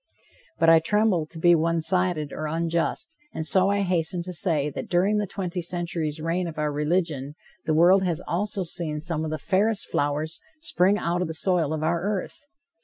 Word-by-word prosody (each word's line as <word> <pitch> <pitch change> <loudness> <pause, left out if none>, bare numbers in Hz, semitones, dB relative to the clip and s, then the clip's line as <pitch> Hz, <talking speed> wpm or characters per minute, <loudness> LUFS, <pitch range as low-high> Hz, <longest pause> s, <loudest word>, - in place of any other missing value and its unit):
But 165 - +2
I 165 0 +8
tremble 195 -2 +1
to 165 - -10
be 175 +2 +5
one 165 0 +2
sided 175 -3 0
or 155 - -4
unjust, 165 +5 -2 0.2
and 160 - -2
so 190 +4 +4
I 200 0 +1
hasten 180 -2 -1
to 180 +1 -6
say 155 -5 +2
that - - -6
during 190 +4 +2
the 210 -1 -1
twenty 180 -2 -4
centuries' 170 -3 -2
reign 170 +3 -1
of 160 -2 -8
our 150 -1 0
religion, 150 -2 -1 0.3
the 155 - +2
world 180 +4 +6
has 175 -4 -1
also 200 +2 -1
seen 165 -3 -2
some 160 0 -3
of 160 - -3
the 155 - -2
fairest 200 +7 +1
flowers 150 +3 -1 0.2
spring 200 - +2
out 175 -2 -1
of 180 - -1
the 160 - -6
soil 170 -3 +1
of 155 -1 -2
our 170 +1 0
earth. 205 +8 -4
170 Hz, 195 wpm, -25 LUFS, 155-185 Hz, 0.3 s, I